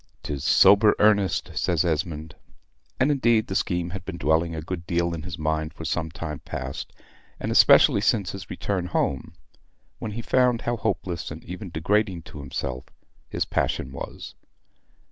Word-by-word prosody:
"'Tis 70 -2 -4
sober 105 +1 +6
earnest," 100 -3 +2
says 85 -1 +1
Esmond. 80 -1 -2 0.7
And, 130 +4 +3
indeed, 120 -6 +3
the 95 - -5
scheme 90 -2 -1
had 95 -1 -6
been - - -6
dwelling 80 +3 +1
a 80 - -4
good 85 0 -6
deal 85 0 0
in 80 - -4
his 90 +1 -7
mind 80 0 -2
for 80 - -7
some 80 -1 -1
time 75 -2 -6
past, 65 +1 -6 0.5
and - - -3
especially - - +6
since 100 -5 +1
his 95 -3 -8
return 95 -3 -2
home, 70 -6 -1 0.7
when 105 - -5
he 115 - -4
found 125 -1 +2
how 120 - -1
hopeless, 95 -7 -2
and - - -8
even 90 +3 -7
degrading 95 +2 0
to 75 - -11
himself, 65 -2 -4 0.4
his - - -1
passion 65 - -1
was. 70 - -7
85 Hz, 165 wpm, -25 LUFS, 80-100 Hz, 0.7 s, sober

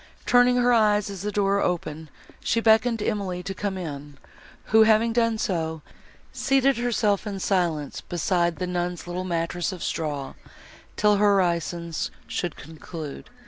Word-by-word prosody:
Turning 245 0 +5
her 245 0 +3
eyes, 210 -3 +3
as 195 -3 -7
the 210 +1 -2
door 200 -1 +1
opened, 160 -3 -2 0.3
she 230 - +1
beckoned 225 +1 +4
to 210 - -4
Emily 185 -3 -2
to 195 - -4
come 195 0 -3
in, 145 -5 -7 0.6
who, 220 - +8
having 220 +1 +4
done 230 -1 +2
so, 160 -6 -2 0.5
seated 270 0 +2
herself 225 -4 0
in 200 -2 -4
silence 170 -7 -1
beside 175 0 0
the 180 - -3
nun's 180 -1 -3
little 175 +1 -4
mattress 170 0 -2
of 185 -3 -7
straw, 145 -4 -3 0.6
till 210 -1 +3
her 205 -1 +4
orisons 170 -2 -1 0.2
should 175 -3 -3
conclude. 155 -1 -9
185 Hz, 150 wpm, -25 LUFS, 170-215 Hz, 0.6 s, who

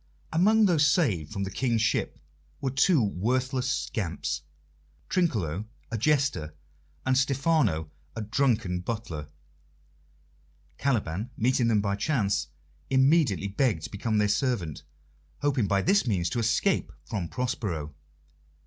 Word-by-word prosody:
Among 210 +6 +5
those 160 -6 +4
saved 110 - +1
from 100 -2 -3
the 95 - -4
King's 115 0 0
ship 110 - 0 0.4
were 135 -2 -1
two 140 +1 +4
worthless 125 +6 0
scamps 80 - -2 0.7
Trinculo, 105 - 0 0.3
a 115 - -1
jester, 135 - +1 0.5
and 130 - +3
Stephano, 135 - +1 0.2
a 110 - -3
drunken 110 -5 +1
butler. 90 -7 -5 1.5
Caliban, 110 - -1
meeting 120 +1 +2
them 110 -3 +3
by 100 -1 0
chance, 100 - 0 0.4
immediately 135 - +3
begged 100 - 0
to - - -6
become 110 +2 -1
their 105 0 +3
servant, 105 - -1 0.6
hoping 135 -7 +2
by 100 0 +1
this 195 -5 +3
means 90 -6 0
to 120 - -1
escape 115 - +1
from 100 -6 -3
Prospero. 90 - -3
115 Hz, 120 wpm, -27 LUFS, 95-135 Hz, 1.5 s, Among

